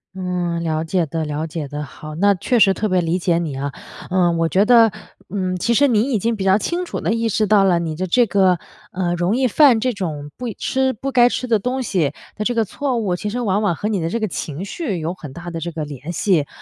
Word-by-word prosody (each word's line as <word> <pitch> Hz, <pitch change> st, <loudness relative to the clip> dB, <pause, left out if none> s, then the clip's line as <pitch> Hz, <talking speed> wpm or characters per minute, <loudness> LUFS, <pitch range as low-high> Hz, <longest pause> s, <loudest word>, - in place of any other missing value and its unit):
嗯， 180 Hz, -2 st, -2 dB
了 160 Hz, -1 st, -1 dB
解 170 Hz, +1 st, 0 dB
的， 160 Hz, +2 st, -3 dB
了 150 Hz, +1 st, -3 dB
解 155 Hz, -2 st, -5 dB
的。 145 Hz, +1 st, -5 dB
好， 155 Hz, +1 st, -9 dB
那 200 Hz, +4 st, +4 dB
确 240 Hz, +6 st, 0 dB
实 195 Hz, -2 st, +6 dB
特 215 Hz, +2 st, -2 dB
别 185 Hz, -1 st, +2 dB
理 170 Hz, +2 st, 0 dB
解 170 Hz, -1 st, +1 dB
你 160 Hz, -5 st, -3 dB
啊， 140 Hz, +1 st, -3 dB, 0.4 s
呃， 180 Hz, -2 st, +3 dB
我 165 Hz, -1 st, 0 dB
觉 195 Hz, +2 st, +3 dB
得， 230 Hz, -2 st, +6 dB, 0.4 s
嗯， 185 Hz, -1 st, -2 dB
其 235 Hz, +7 st, 0 dB
实 285 Hz, +4 st, +5 dB
你 220 Hz, -5 st, +3 dB
已 225 Hz, -, +2 dB
经 230 Hz, +3 st, 0 dB
比 195 Hz, -, -4 dB
较 190 Hz, +1 st, +4 dB
清 345 Hz, -, -2 dB
楚 -, -, -5 dB
地 -, -, -1 dB
意 230 Hz, 0 st, 0 dB
识 215 Hz, +1 st, +1 dB
到 205 Hz, -1 st, +4 dB
了 185 Hz, -3 st, +3 dB
你 165 Hz, -2 st, -3 dB
的 185 Hz, +3 st, -3 dB
这 240 Hz, +7 st, +4 dB
个， 190 Hz, -4 st, +3 dB, 0.3 s
呃， 180 Hz, -2 st, -1 dB
容 175 Hz, +7 st, 0 dB
易 260 Hz, -1 st, +2 dB
犯 255 Hz, -1 st, +5 dB
这 250 Hz, +1 st, 0 dB
种 150 Hz, -7 st, -5 dB
不 245 Hz, -2 st, -4 dB
吃 265 Hz, 0 st, 0 dB
不 270 Hz, +5 st, -4 dB
该 245 Hz, -1 st, +5 dB
吃 250 Hz, -, -3 dB
的 225 Hz, -4 st, +2 dB
东 255 Hz, +4 st, -2 dB
西 170 Hz, -, 0 dB, 0.2 s
的 210 Hz, -, -3 dB
这 245 Hz, +2 st, 0 dB
个 225 Hz, -, +2 dB
错 260 Hz, +4 st, -2 dB
误 200 Hz, -6 st, 0 dB
其 210 Hz, +4 st, -4 dB
实 240 Hz, +4 st, -3 dB
往 210 Hz, -3 st, +1 dB
往 200 Hz, -5 st, +1 dB
和 205 Hz, -, -3 dB
你 205 Hz, -4 st, 0 dB
的 165 Hz, 0 st, -2 dB
这 230 Hz, -, -2 dB
个 215 Hz, -, 0 dB
情 165 Hz, -1 st, -5 dB
绪 205 Hz, -, -3 dB
有 160 Hz, +2 st, -3 dB
很 150 Hz, -7 st, -10 dB
大 175 Hz, +3 st, -8 dB
的 165 Hz, -, -4 dB
这 170 Hz, +1 st, -4 dB
个 155 Hz, -2 st, -4 dB
联 145 Hz, +3 st, -7 dB
系。 165 Hz, -4 st, +1 dB
185 Hz, 280 characters per minute, -20 LUFS, 165-225 Hz, 0.4 s, 实